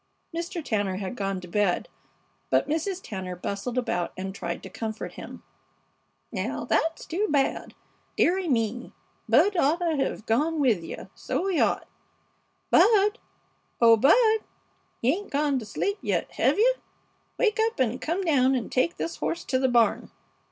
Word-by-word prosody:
Mr. 340 -1 -4
Tanner 205 -4 0
had 195 +4 -4
gone 195 -3 -2
to 180 - -10
bed, 195 0 0 0.6
but - - +2
Mrs. 330 +5 -2
Tanner 190 -4 -5
bustled 200 +7 -4
about 180 -9 -1
and 190 +1 -4
tried 170 -3 -5
to - - -8
comfort 220 -1 -5
him. - - -10 0.9
"Now - - -3
that's 325 0 0
too 390 +6 -1
bad! 280 -2 0 0.4
Dearie 365 0 +2
me! 235 -1 -1 0.4
Bud 325 - +4
oughta 335 +1 +2
hev 270 -5 -2
gone 300 +9 +1
with 230 - +2
you, - - -8
so 365 - -3
he 380 -3 +1
ought. - - +1 0.8
Bud! 420 0 +5 0.6
Oh, 230 -1 +7
Bud, 440 - +5 0.6
you 255 +4 +4
'ain't 405 +4 -6
gonta 280 -4 0
sleep 400 - -2
yet, - - -1
hev - - +2
you? - - +5 0.6
Wake 445 -2 +1
up 450 +1 0
and 250 -1 0
come 345 +5 -1
down 270 -6 +3
and 245 - -3
take 260 +7 +1
this 330 - -4
horse 340 +1 -2
to 260 - 0
the 260 0 +2
barn." 235 -2 +2
270 Hz, 155 wpm, -26 LUFS, 220-345 Hz, 0.9 s, Oh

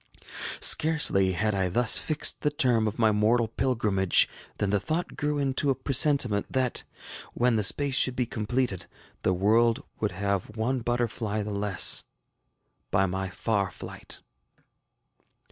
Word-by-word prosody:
Scarcely 150 -12 +3
had 105 +3 -1
I 95 -2 -1
thus 115 +5 +4
fixed 155 -1 +1
the 150 - +1
term 125 -7 +1
of 105 - -5
my 110 -2 +3
mortal 110 +3 +1
pilgrimage, 110 -6 +1 0.3
than 100 -1 -1
the 105 - +1
thought 160 - -4
grew 150 0 -2
into 140 0 0
a 135 - +1
presentiment 135 -7 +2
that, 130 -2 -1 0.5
when 120 -1 +1
the 110 - +1
space 140 +7 +2
should 130 - +5
be 125 - -1
completed, 115 -3 -3 0.3
the 95 - 0
world 110 +5 +2 0.2
would 105 -3 -2
have 100 +2 -3
one 125 +4 -1
butterfly 115 -3 -3
the 105 - -6
less, 100 -3 +2 0.9
by 95 - +1
my 95 +1 -4
far 100 -1 -2
flight. - - -8
110 Hz, 145 wpm, -26 LUFS, 100-130 Hz, 0.9 s, should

